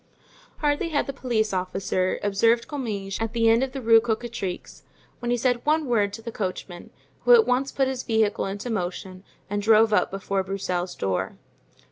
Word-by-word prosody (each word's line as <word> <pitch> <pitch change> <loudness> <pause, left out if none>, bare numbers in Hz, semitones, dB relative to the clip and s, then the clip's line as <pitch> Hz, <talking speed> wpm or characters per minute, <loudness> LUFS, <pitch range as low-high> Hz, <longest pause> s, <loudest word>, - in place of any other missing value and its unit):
Hardly 295 +3 0
had 290 -3 0
the 275 - -5
police 230 -6 -1
officer 185 0 -1
observed 225 +4 +2
Comminges 210 -9 -4
at 225 0 -2
the 230 -1 +2
end 225 +2 +5
of 265 -1 -1
the 265 -1 -6
Rue 225 0 +6
Cocatrix 225 -5 -4 0.4
when 240 - -4
he 245 - +2
said 245 0 0
one 310 +1 +2
word 215 -5 +1
to 225 - -8
the 230 - -5
coachman, 185 -3 -5 0.3
who - - +6
at 450 -2 +5
once 265 +2 +1
put 270 -1 +1
his 260 -1 -3
vehicle 220 -5 +1
into 205 +5 -5
motion 185 -1 -4 0.2
and 205 0 -2
drove 220 +1 +5
up - - +3
before 195 0 -2
Broussel's 185 -2 -3
door. 95 -2 -2
225 Hz, 180 wpm, -25 LUFS, 195-245 Hz, 0.4 s, Rue